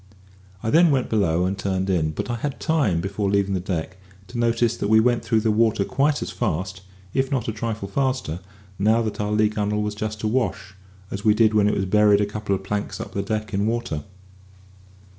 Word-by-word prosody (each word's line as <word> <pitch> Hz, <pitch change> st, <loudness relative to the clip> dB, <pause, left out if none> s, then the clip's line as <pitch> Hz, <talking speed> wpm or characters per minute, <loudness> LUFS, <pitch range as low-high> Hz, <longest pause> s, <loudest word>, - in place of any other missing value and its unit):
I 110 Hz, -, 0 dB
then 170 Hz, +1 st, +6 dB
went 135 Hz, -4 st, +1 dB
below 90 Hz, -5 st, +2 dB
and 95 Hz, +2 st, -1 dB
turned 95 Hz, -1 st, -2 dB
in; 85 Hz, -5 st, +1 dB
but 75 Hz, +10 st, -4 dB
I 120 Hz, -, -2 dB
had 140 Hz, +4 st, -4 dB
time, 140 Hz, -, +1 dB
before 100 Hz, +2 st, -2 dB
leaving 100 Hz, 0 st, +1 dB
the 95 Hz, -, 0 dB
deck, 90 Hz, 0 st, -4 dB, 0.3 s
to 120 Hz, -, -5 dB
notice 120 Hz, 0 st, +2 dB
that -, -, -2 dB
we 110 Hz, +1 st, +6 dB
went 120 Hz, +1 st, +2 dB
through 110 Hz, -2 st, +2 dB
the 110 Hz, 0 st, +2 dB
water 110 Hz, -2 st, +2 dB
quite 140 Hz, +3 st, +1 dB
as -, -, -5 dB
fast 95 Hz, +3 st, -2 dB, 0.3 s
(if 135 Hz, 0 st, +1 dB
not 130 Hz, -5 st, -1 dB
a -, -, 0 dB
trifle 110 Hz, -2 st, -4 dB
faster), 130 Hz, -, -1 dB, 0.4 s
now 110 Hz, +3 st, +3 dB
that 110 Hz, -1 st, -3 dB
our 105 Hz, 0 st, -1 dB
lee 105 Hz, 0 st, +3 dB
gunwale 105 Hz, 0 st, -1 dB
was 105 Hz, 0 st, -2 dB
just 110 Hz, 0 st, -5 dB
awash, 105 Hz, -4 st, -1 dB, 0.4 s
as 100 Hz, +1 st, -5 dB
we 105 Hz, -1 st, +4 dB
did 110 Hz, -1 st, +4 dB
when 105 Hz, -1 st, +4 dB
it 105 Hz, -, +1 dB
was 95 Hz, -, 0 dB
buried 105 Hz, +1 st, +4 dB
a 105 Hz, -, +2 dB
couple 105 Hz, -1 st, -2 dB
of 95 Hz, -, -6 dB
planks 105 Hz, +1 st, -3 dB
up -, -, -7 dB
the 100 Hz, -, -1 dB
deck 110 Hz, +2 st, -3 dB
in 100 Hz, +2 st, +1 dB
water. 115 Hz, -10 st, -2 dB
105 Hz, 215 wpm, -23 LUFS, 100-115 Hz, 0.4 s, then